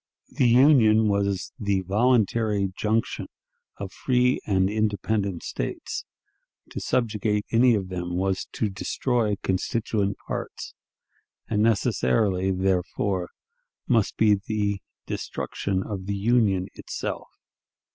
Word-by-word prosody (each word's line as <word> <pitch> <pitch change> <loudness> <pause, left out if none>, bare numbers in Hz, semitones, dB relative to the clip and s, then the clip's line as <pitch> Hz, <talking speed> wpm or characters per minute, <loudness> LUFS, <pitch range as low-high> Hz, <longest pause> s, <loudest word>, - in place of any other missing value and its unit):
The 125 - +2
Union 115 -4 +6
was 100 -2 0
the 100 -3 0
voluntary 105 -1 +2
junction 110 +1 -1 0.5
of - - -6
free 125 0 +2
and 95 -2 +3
independent 105 -2 -1
States; - - -4 0.7
to - - -4
subjugate 105 -3 0
any 120 +1 +5
of 95 -3 -3
them 90 -1 -4
was 95 +1 -1
to 105 -3 -1
destroy 110 +2 0
constituent 100 +1 -1
parts, - - -5 0.7
and 105 -1 0
necessarily, 95 - +2
therefore, 95 0 0 0.6
must 115 -5 +2
be 110 -2 +5
the 100 -1 -1 0.2
destruction 95 -1 -3
of 95 -2 -6
the 100 - -1
Union 100 -3 +2
itself. - - -5
105 Hz, 105 wpm, -25 LUFS, 95-110 Hz, 0.7 s, Union